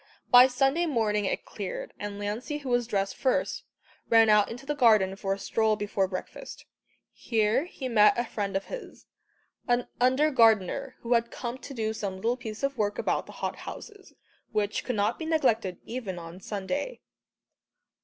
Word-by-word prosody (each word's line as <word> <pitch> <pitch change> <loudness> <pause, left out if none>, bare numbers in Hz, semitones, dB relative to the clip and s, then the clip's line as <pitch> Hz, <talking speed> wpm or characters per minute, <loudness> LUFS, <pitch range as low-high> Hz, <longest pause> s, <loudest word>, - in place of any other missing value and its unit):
By 250 +1 +9
Sunday 270 +6 +1
morning 215 -7 +1
it - - -2
cleared, - - -6
and 205 0 -5
Lancey 215 +9 -3
who 280 -3 -7
was 245 -1 +1
dressed 195 -3 -1
first, 260 - 0 0.4
ran 225 -1 +6
out 210 -1 +5
into 245 +4 -8
the 295 - -1
garden 215 -8 +4
for 195 -1 -3
a - - -11
stroll 220 +2 +1
before 205 -2 -1
breakfast. 190 - -7 0.5
Here 225 +5 +1
he 275 -7 -6
met 215 -3 +5
a 240 - 0
friend 200 -3 -2
of 195 - -5
his - - -9 0.6
an 245 -1 +1
under 260 +5 +3
gardener, 230 +2 +3
who 235 +1 0
had 235 0 +2
come 245 +1 -5
to 275 - -9
do 220 -2 -1
some 200 -3 -4
little 230 +6 0
piece 220 -1 -8
of 275 -3 -1
work 205 -1 0
about - - -1
the - - -10
hot - - -3
houses, 415 -3 -10 0.4
which 210 -1 -1
could 250 - -2
not 205 0 0
be 320 - -4
neglected 230 - +1
even 225 -7 -5
on 170 +2 -9
Sunday. 250 - -4
230 Hz, 175 wpm, -28 LUFS, 205-260 Hz, 0.6 s, By